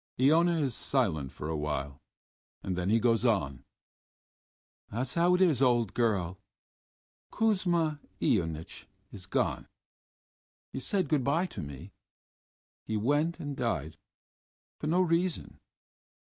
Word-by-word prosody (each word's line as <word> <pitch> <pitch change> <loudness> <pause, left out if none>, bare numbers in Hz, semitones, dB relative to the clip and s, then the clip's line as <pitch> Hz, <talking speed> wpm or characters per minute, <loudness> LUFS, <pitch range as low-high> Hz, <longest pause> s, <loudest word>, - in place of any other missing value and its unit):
Iona 165 +6 +4
is 135 -5 0
silent 85 - 0
for 75 - -7
a 80 - -2
while, 75 -2 -3 0.6
and 95 - -2
then 90 +1 -1
he 110 - +4
goes 115 0 +2
on: 95 - +1 1.3
"That's 125 +4 -3
how 175 +1 +4
it 180 - 0
is, 155 -8 +3
old 120 -6 +3
girl.... 100 -6 0 0.9
Kuzma 175 -9 +1 0.2
Ionitch 80 -6 -1 0.2
is 95 -3 -10
gone.... - - -1 1.1
He - - -3
said 185 +5 -1
good 140 -2 +1
by 155 +8 +2
to 180 - -7
me.... 70 +6 -8 0.9
He 110 - -2
went 145 +9 +1
and 145 -1 -4
died 80 - -2 0.8
for - - -3
no 175 +4 +3
reason.... 175 0 0
120 Hz, 125 wpm, -30 LUFS, -, 1.3 s, Iona